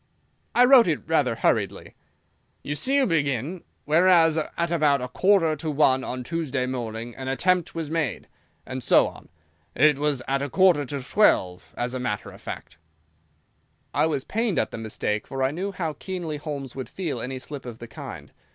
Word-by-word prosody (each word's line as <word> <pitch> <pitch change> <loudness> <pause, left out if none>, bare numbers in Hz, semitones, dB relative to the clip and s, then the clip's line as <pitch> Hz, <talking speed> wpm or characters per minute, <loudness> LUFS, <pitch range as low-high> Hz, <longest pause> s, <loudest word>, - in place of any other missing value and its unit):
"I 245 - +7
wrote 250 -4 +7
it 155 -4 -1
rather 145 -7 +2
hurriedly." - - 0 0.7
"You 145 - -3
see 260 - 0
you 280 -1 +4
begin, 150 - -1 0.2
'Whereas, 165 0 +5
at 170 +2 -3
about 150 -4 +3
a 125 - -4
quarter 165 +3 +3
to 155 +2 -4
one 135 -3 +3
on 125 0 -4
Tuesday 140 -4 -2
morning 120 -2 -5
an 130 - -7
attempt 180 +6 +1
was 160 -2 -4
made,' 165 -1 -2 0.4
and 130 0 -5
so - - +5
on. - - -12 0.5
It 150 -2 +4
was 145 -4 0
at 135 0 0
a 140 - -2
quarter 175 -5 +4
to 140 0 -4
twelve, 95 - +2
as 120 +1 -2
a 130 - -3
matter 105 -5 -3
of - - -15
fact." 75 - -8 1.1
I - - +3
was 145 -4 -1
pained 225 +1 -1
at - - 0
the - - -6
mistake, 105 -1 -3
for 135 -1 -3
I 130 - +2
knew 190 +6 -3
how 165 -5 -3
keenly 170 -1 -5
Holmes 145 -4 -6
would 130 -1 -6
feel 160 -11 -4
any 130 +2 -4
slip 135 +1 -7
of 120 -2 -7
the 120 - -9
kind. 115 - -9
145 Hz, 185 wpm, -25 LUFS, 130-170 Hz, 1.1 s, I